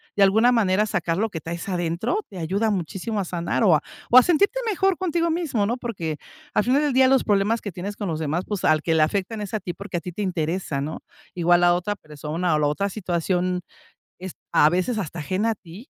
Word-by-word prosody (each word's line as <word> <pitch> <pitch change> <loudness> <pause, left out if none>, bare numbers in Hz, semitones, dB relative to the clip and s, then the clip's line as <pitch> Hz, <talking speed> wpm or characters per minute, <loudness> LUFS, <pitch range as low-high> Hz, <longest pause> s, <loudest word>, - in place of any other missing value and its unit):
De 200 - +4
alguna 220 +5 +5
manera 210 -2 +2
sacar 170 -5 -1
lo 220 +3 0
que 160 -5 -6
traes 170 +3 -6
adentro, 175 - -1
te 195 - -10
ayuda 195 +7 0
muchísimo 195 +4 -3
a 195 - -1
sanar 170 +5 -1
o 175 -5 +6
a 150 - +1 0.3
o 245 - +8
a 255 - +10
sentirte 400 - +2
mejor 385 -2 +1
contigo 340 -2 0
mismo, 310 -11 0
¿no? 230 +4 0
Porque 175 - -4 0.4
al - - +3
final 260 +6 +2
del 290 -3 +1
día 260 +1 +5
los 265 -1 +4
problemas 210 +2 +2
que 205 - -5
tienes 200 +3 -5
con 205 - -3
los 160 -3 -2
demás, 160 +3 -1
pues, 205 -4 -3
al 155 -1 +4
que 165 - 0
le 155 - +5
afectan 200 +6 -2
es 205 +1 -6
a 215 - 0
ti, 175 - -5
porque 200 0 -5
a - - -1
ti 180 - -6
te 210 - -5
interesa, 170 -4 -2
¿no? 155 +3 -4 0.4
Igual 175 0 +3
a 175 - +5
otra 195 +4 -2
persona 155 +2 -2
o 150 - +1
la 145 - +2
otra 195 +7 0
situación 180 -2 -1 0.6
es 185 -2 -7 0.2
a 150 - +6
veces 185 +7 0
hasta 175 -3 -5
ajena 190 +9 0
a - - -3
ti, 195 - -13
185 Hz, 240 wpm, -23 LUFS, 170-220 Hz, 0.6 s, a